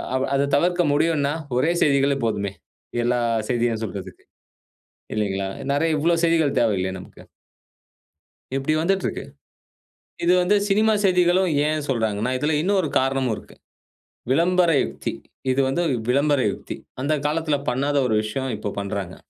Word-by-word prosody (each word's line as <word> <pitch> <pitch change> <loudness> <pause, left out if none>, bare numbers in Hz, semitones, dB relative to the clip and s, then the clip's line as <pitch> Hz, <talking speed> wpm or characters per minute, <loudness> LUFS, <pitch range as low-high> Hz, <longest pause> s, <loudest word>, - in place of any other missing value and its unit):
அவ் 130 - +1
அத 140 +1 +1
தவிர்க்க 175 +4 +2
முடியுன்னா 145 -2 +1 0.2
ஒரே 150 +6 +2
செய்திகளே 140 -1 +3
போதுமே. 100 -3 -1 0.5
எல்லா 120 +1 +1 0.3
செய்தியும் 115 -2 0
சொல்றதுக்கு. 370 - -7 0.9
இல்லைங்களா? 100 -2 -1 0.2
நெறைய 155 +2 +1
இவ்வளோ 170 +3 +2
செய்திகள் 160 -4 +2
தேவையில்லையே 95 -5 0
நமக்கு. 90 - -13 1.3
இப்படி 135 +3 0
வந்துட்டுருக்கு. 195 +3 -1 1.0
இது 175 - +4
வந்து 195 +4 +3
சினிமா 215 +2 +3
செய்திகளும் 180 -1 +3 0.2
ஏன் 155 -1 -1
சொல்றாங்கன்னா, 110 -1 0
இதுல 150 +2 +1
இன்னொரு 190 -2 +1
காரணமும் 130 -2 0
இருக்கு. - - -13 0.8
"விளம்பர 175 +3 +3 0.2
யுக்தி!" - - -5 0.4
இது 130 - 0
வந்து 155 +6 0 0.3
விளம்பர 140 +2 +3
யுக்தி. - - -7 0.3
அந்த 145 +3 +1
காலத்துல 155 0 0
பண்ணாத 140 +3 0
ஒரு 110 - +1
விஷயம். 130 +5 -3
இப்போ 105 - -4
பண்றாங்க. 100 -2 -4
140 Hz, 125 wpm, -23 LUFS, 120-165 Hz, 1.3 s, இது